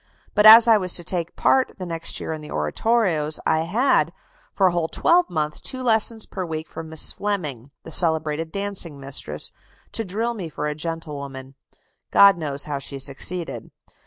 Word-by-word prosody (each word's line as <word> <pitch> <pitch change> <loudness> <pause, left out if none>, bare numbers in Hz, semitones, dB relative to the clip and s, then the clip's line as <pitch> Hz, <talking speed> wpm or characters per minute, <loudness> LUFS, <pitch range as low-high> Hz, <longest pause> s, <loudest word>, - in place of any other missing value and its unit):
But 210 +1 +5
as 225 +2 +10
I 225 -2 +6
was 185 -3 +2
to 175 - +4
take 170 -1 -2
a - - -37
part 265 -1 +1
the 185 - -6
next 165 -1 -3
year - - -4
in 155 - -7
the 150 - -11
oratorios, 155 - 0
I 160 +1 +1
had, 220 - +2 0.4
for 195 - +1
a 185 - +4
whole 170 -2 -1
twelvemonth, 165 - +1
two 260 -1 -4
lessons 225 -1 +1
per 190 - -6
week 160 -2 -5
from 160 -1 -9
Miss 160 -1 +1
Fleming, 150 - -4
the - - -10
celebrated 160 -1 +1
dancing 195 -7 -3
mistress, 135 0 -3 0.4
to 225 - -1
drill 225 +5 -2
me 190 -8 -6
for 150 - -5
a 150 - -1
gentlewoman 145 -4 -6 0.6
(God 200 0 +7
knows 145 -4 -4
how 145 -2 -4
she 140 0 -6
succeeded). 145 +6 -2
165 Hz, 180 wpm, -22 LUFS, 150-200 Hz, 0.6 s, as